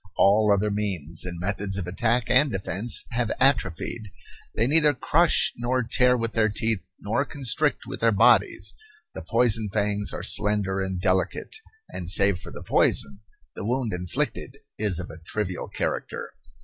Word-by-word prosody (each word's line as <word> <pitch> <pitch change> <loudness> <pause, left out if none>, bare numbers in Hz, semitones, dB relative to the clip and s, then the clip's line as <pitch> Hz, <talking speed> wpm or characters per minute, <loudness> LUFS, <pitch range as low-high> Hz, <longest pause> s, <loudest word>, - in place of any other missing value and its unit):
All 105 +1 +4
other 100 +1 +2
means 90 -6 -2
and 85 -2 -6
methods 95 +1 -3
of 95 - -3
attack 115 +6 0
and 130 +2 +4
defence 100 +3 -1
have 120 -1 -1
atrophied. 110 -4 0 0.5
They 115 - +2
neither 150 +1 +4
crush 165 +6 +2
nor 125 +1 0
tear 125 +2 +3
with 115 -1 -2
their 110 0 +2
teeth 110 0 -1 0.2
nor 110 +7 -1
constrict 135 -4 -1
with - - -7
their 115 0 +3
bodies. 115 +4 +3 0.4
The - - -7
poison 115 -3 +1
fangs 105 0 -1
are - - -6
slender 100 -2 +1
and 95 -1 -3
delicate, 95 - -1 0.3
and, 90 -2 -7
save 100 -1 +4
for - - -10
the - - -9
poison, 70 +8 +1 0.3
the - - -7
wound 120 -1 -1
inflicted 90 -1 -3 0.2
is 105 -5 0
of 90 0 -5
a 80 - -11
trivial 95 0 -4
character. - - -4
105 Hz, 160 wpm, -25 LUFS, 95-120 Hz, 0.5 s, All